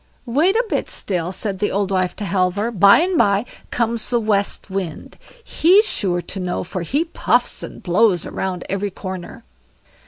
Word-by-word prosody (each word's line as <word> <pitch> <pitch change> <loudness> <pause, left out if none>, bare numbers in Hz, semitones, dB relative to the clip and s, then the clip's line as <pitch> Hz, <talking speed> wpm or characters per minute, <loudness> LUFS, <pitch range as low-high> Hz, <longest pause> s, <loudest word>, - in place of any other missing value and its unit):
"Wait 300 - +2
a 475 +2 +2
bit - - -2
still", 180 -3 -1
said 195 0 -3
the 205 - +1
old 200 0 -1
wife 185 -1 0
to 210 - -5
Halvor, 195 +4 0
"by 200 -2 +6
and 360 -1 +1
bye 205 0 +3 0.2
comes 230 -1 -1
the 240 - +2
West 205 -3 0
Wind; 190 -5 -5 0.3
he's 385 +5 +4
sure 175 - +1
to 195 - -6
know 180 -1 -2
it, - - -6
for 185 +1 -5
he 280 - 0
puffs 335 - 0
and - - -9
blows 185 -1 +2
round 185 -2 -4
every 195 +1 -2
corner." 185 -2 -8
200 Hz, 180 wpm, -20 LUFS, 185-235 Hz, 0.3 s, by